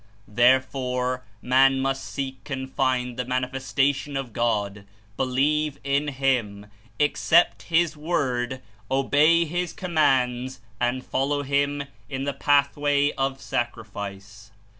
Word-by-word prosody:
Therefore 125 +1 +1 0.2
man 135 +1 +4
must 135 0 -1
seek 135 0 -6
and 130 -1 -3
find 125 -2 0
the 125 - -1
Mani 130 +1 0
festation 135 +2 -1
of 125 -5 -7
God, 105 -4 -1 0.3
believe 145 +4 +1
in 140 +2 0
Him, 125 -7 -1 0.3
accept 160 +3 +3
His 170 -1 +2
Word, 130 -5 -2 0.3
obey 145 +5 +4
His 175 +2 -3
Commands, 130 -7 +1 0.2
and 125 +1 -1
follow 145 +2 0
Him 140 +1 0 0.3
in 130 0 -3
the 140 0 -2
path 140 0 +2
way 145 0 +2
of 135 0 -2
sacrifice. 105 -4 -5
135 Hz, 120 wpm, -25 LUFS, 125-145 Hz, 0.3 s, man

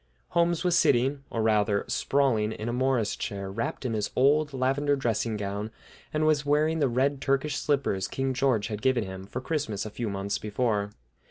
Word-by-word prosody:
Holmes 170 0 +1
was 180 -1 +2
sitting, 135 +1 +3
or, 115 - -1
rather, 105 -2 +2
sprawling 115 -6 +1
in 110 - -6
a 120 - -1
Morris 125 -4 +1
chair, 100 -3 -4
wrapped 115 +5 -3
in 120 - -1
his 105 -1 -1
old 145 +3 +3
lavender 135 +2 +1
dressing 115 -4 -1
gown, 100 +1 -3 0.4
and 155 0 0
was 155 -2 +3
wearing 155 +2 +2
the 140 -3 +2
red 135 +3 +1
Turkish 140 +2 0
slippers 135 -10 0
King 135 +4 -2
George 125 -5 +1
had 105 -1 -4
given 130 -3 +2
him 95 -1 -8
for 125 - -5
Christmas 130 -9 -2
a 110 - -6
few 115 +1 -3
months 100 0 -2
before. 105 -1 -1
125 Hz, 185 wpm, -27 LUFS, 105-140 Hz, 0.4 s, sitting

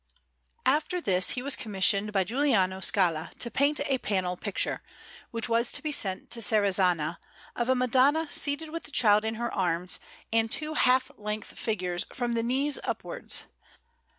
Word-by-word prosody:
After 305 +6 +1
this 185 - +2
he 250 - -3
was 280 0 +3
commissioned 200 -1 +1
by 195 -2 +2
Giuliano 215 -5 +1
Scala 180 -6 +1
to 235 - -2
paint 285 +2 +1
a 270 -2 0
panel 185 -5 -1
picture, 205 +2 -2 0.5
which 230 0 -1
was 235 0 +2
to - - 0
be 305 - -2
sent 195 -9 0
to 235 - +1
Serrazzana, 185 -7 +2 0.4
of 240 +1 -2
a 260 - +4
Madonna 260 +5 +2
seated 305 +2 0
with 330 +1 -4
the - - -11
Child 215 -6 +4
in 220 0 -2
her 235 +1 -3
arms, 180 -1 0 0.3
and 225 0 +1
two 310 0 0
half 255 -3 +2
length 210 0 -5
figures 180 -5 -2
from 240 -1 -2
the 230 - 0
knees 270 +5 0
upwards, - - -2
S. - - -19
225 Hz, 170 wpm, -28 LUFS, 190-265 Hz, 0.5 s, a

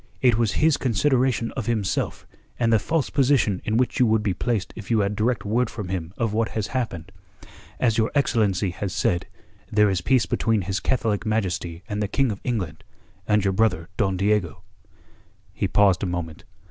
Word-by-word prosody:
It 125 -3 +4
was 115 -3 +1
his 155 -2 +3
consideration 125 -1 +1
of 120 -6 -5
himself 110 -5 -1 0.3
and 115 -1 +2
the 110 - +5
false 160 +6 -1
position 130 -8 +2
in 110 - 0
which 125 -1 0
you 125 - +5
would 110 -1 +2
be 100 -3 0
placed 105 +1 -2
if 110 - -9
you 115 -2 +3
had 100 +1 -1
direct 115 +3 0
word 115 +3 +1
from 105 -5 -6
him 90 -3 -3
of 115 -3 -1
what 110 +1 +1
has 110 - 0
happened. 110 -11 -3 0.7
As 115 -3 +2
your 110 - +2
excellency 105 -9 +1
has 95 +1 -4
said, 85 - 0 0.4
there 105 -1 +4
is 90 -3 -1
peace 130 +6 +3
between 110 -3 0
His 95 +2 -2
Catholic 115 -5 0
Majesty 95 -6 -2
and 105 -2 -3
the 105 - 0
King 135 +3 +1
of 100 - -7
England, 95 -11 -3 0.4
and 105 -1 +3
your 95 - +2
brother 95 -5 +1
Don 95 -5 0
Diego...." 100 -5 0 0.9
He - - -1
paused 100 -3 +3
a 95 - -1
moment. 85 -3 -5
105 Hz, 190 wpm, -24 LUFS, 95-120 Hz, 0.9 s, the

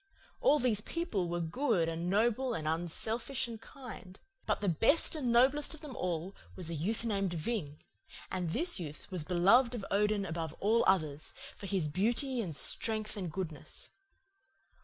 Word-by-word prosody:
All 485 -11 +5
these 240 -7 +4
people 215 - -2
were 175 0 -1
good 175 - +1
and 165 +2 -2
noble 235 +5 +2
and 155 -1 -3
unselfish 220 - 0
and 230 -2 -8
kind; 225 -8 -11 0.3
but 210 - +1
the 205 - -2
best 225 - +3
and 290 -5 -2
noblest 265 +6 +3
of 315 - -13
them 290 -5 -8
all 180 -3 -3 0.2
was 170 -3 +1
a - - -2
youth 205 +9 -1
named 195 -5 0
Ving; 155 -4 -3 0.5
and 180 -3 -2
this 330 - +2
youth 155 +2 -7
was 180 -4 -1
beloved 230 - +4
by 195 - -7
Odin 205 0 +2
above 165 -2 -4
all 225 +3 +3
others, 155 -6 +1 0.2
for 200 - -8
his 185 -5 +1
beauty 235 - 0
and 170 -8 -3
strength 215 +6 -1
and 185 -5 -4
goodness. 165 -4 -6
200 Hz, 165 wpm, -32 LUFS, 170-240 Hz, 0.5 s, All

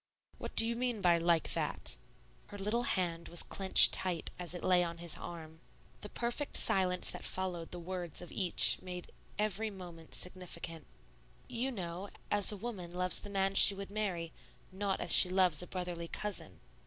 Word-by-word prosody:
"What - - -8
do 225 - +7
you 235 +1 -2
mean 245 -2 -2
by 175 -3 +3
'like 170 -1 +1
that'?" - - -2 0.5
Her 205 - -10
little 210 +4 -1
hand 170 -3 -2
was 170 - -1
clinched 190 -1 +6
tight 180 -4 +1
as 180 0 -4
it 175 - -8
lay 180 -1 +3
on 170 -1 -5
his 170 -1 -3
arm. 160 -2 -10 0.4
The 210 - -8
perfect 240 +7 +1
silence 180 -1 +3
that - - -7
followed 180 -3 -4
the 180 - -6
words 175 -2 -6
of 175 - -8
each 185 -4 +3
made 180 -1 -8 0.3
every 215 +1 -1
movement 175 -5 -11
significant. 170 -3 -4 0.6
"You 250 +2 -2
know, 185 -2 -6 0.2
as 205 0 +6
a 210 - -6
woman 190 -6 -7
loves 180 0 +1
the 205 - -9
man 195 -1 0
she 195 0 +6
would 200 0 -8
marry, 185 -6 -4 0.4
not 195 0 -3
as - - -1
she 180 - +9
loves 180 -4 +3
a 180 - -8
brotherly 175 -2 -5
cousin." 165 - -5
180 Hz, 180 wpm, -32 LUFS, 170-200 Hz, 0.6 s, she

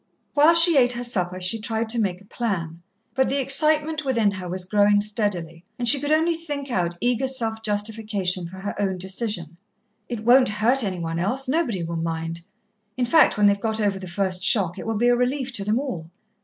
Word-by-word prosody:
While 300 +3 +5
she 335 -2 +6
ate 245 -1 +4
her 240 0 -5
supper 185 -6 -2
she 185 +5 -1
tried 225 +1 -2
to 235 0 +3
make 190 -3 -2
a - - -18
plan, 175 -8 -4 0.3
but 265 -1 +1
the 275 - -1
excitement 305 +3 +3
within 230 -7 +1
her 185 -3 -7
was 185 +1 -3
growing 205 +1 +3
steadily, 200 -6 -3
and 240 - -2
she 280 +4 +6
could 290 +2 -3
only 320 +2 +2
think 290 -5 -6
out 175 -5 -1
eager 245 +4 0
self 225 -4 -1
justification 205 -4 -2
for 185 +2 -12
her 200 +2 -5
own 190 -2 -1
decision. 190 -3 -4 0.5
"It 225 -3 -5
won't 250 0 +5
hurt 230 +5 +1
any 190 -3 -3
one 165 -1 -4
else 250 +10 -1
nobody 255 - -1
will 170 0 -4
mind. 165 0 -4 0.6
In 250 - 0
fact, 315 -1 +4
when 210 - +3
they've 200 0 +3
got 220 -1 -2
over 200 -2 0
the 185 - -8
first 185 0 -3
shock, 185 -3 +2
it - - -7
will 225 -1 -2
be 240 +3 +2
a 245 - +4
relief 255 +2 -2
to 205 - -3
them 210 +3 0
all. 180 - -6
215 Hz, 210 wpm, -23 LUFS, 185-255 Hz, 0.6 s, she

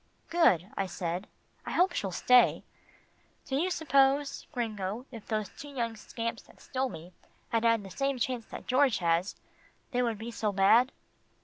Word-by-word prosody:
"Good," 200 - +3
I 195 - -1
said, 180 +1 -4 0.4
"I - - -5
hope 360 0 +3
she'll 195 - -2
stay. 250 +7 +4 0.8
Do 265 - -3
you 335 +7 +1
suppose, 280 -4 +2
Gringo, 220 -3 -3
if 230 -4 -10
those 215 -2 -1
two 290 - -11
young 235 -5 -3
scamps 230 +2 -5
that - - -21
stole 260 0 -2
me 175 -3 -10 0.4
had 230 -2 +1
had 230 -2 +3
the 195 - -10
same 275 +3 -1
chance 245 -1 -2
that - - -9
George 255 -1 +3
has, 170 +2 +1 0.6
they 250 -1 +1
would 230 -3 0
be 225 +3 -6
so 215 -2 -1
bad?" 220 +7 +5
230 Hz, 170 wpm, -30 LUFS, 200-265 Hz, 0.8 s, bad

